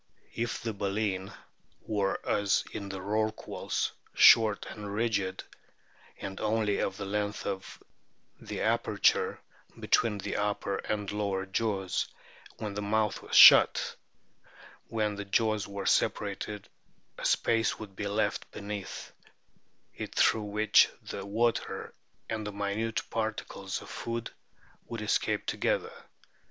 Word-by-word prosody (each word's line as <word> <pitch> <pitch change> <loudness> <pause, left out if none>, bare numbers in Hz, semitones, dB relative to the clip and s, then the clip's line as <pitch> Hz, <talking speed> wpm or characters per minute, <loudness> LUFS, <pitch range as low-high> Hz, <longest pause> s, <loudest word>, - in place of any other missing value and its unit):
If 115 0 -2
the 115 -1 -3
baleen 100 -1 -2 0.5
were, 100 -2 -1
as 100 -1 +2
in 100 -1 -6
the 95 -1 -5
rorquals, 110 +2 -2 0.2
short 110 -3 +7
and 105 -1 -7
rigid, 100 -4 -1 0.8
and 95 0 -6
only 110 -1 +1
of - - -1
the 100 - -4
length 105 +1 -2
of 95 -1 -5 0.6
the - - -6
aperture - - +2 0.4
between 110 -3 +2
the 100 - -3
upper 105 -1 -1
and 105 -2 -3
lower 100 -2 -1
jaws 95 -1 -1 0.5
when 105 -2 -4
the 105 - -3
mouth 105 +1 0
was - - -5
shut, - - +8 0.9
when 105 -2 -1
the 100 - -5
jaws 110 +1 +1
were 100 -1 -6
separated 105 0 0 0.5
a - - -7
space 115 0 +2
would 100 -3 -10
be 100 - -3
left 105 +2 -1
beneath 100 -1 -6 0.8
it - - -7
through 110 -2 +3
which 105 +1 +4
the - - -6
water 115 +3 -1 0.3
and 110 -1 -3
the - - -4
minute 105 +3 -2
particles 110 -1 -3
of - - -12
food 115 0 -4 0.6
would 115 -2 -5
escape 105 - 0
together. - - -1
105 Hz, 125 wpm, -30 LUFS, 100-110 Hz, 0.9 s, shut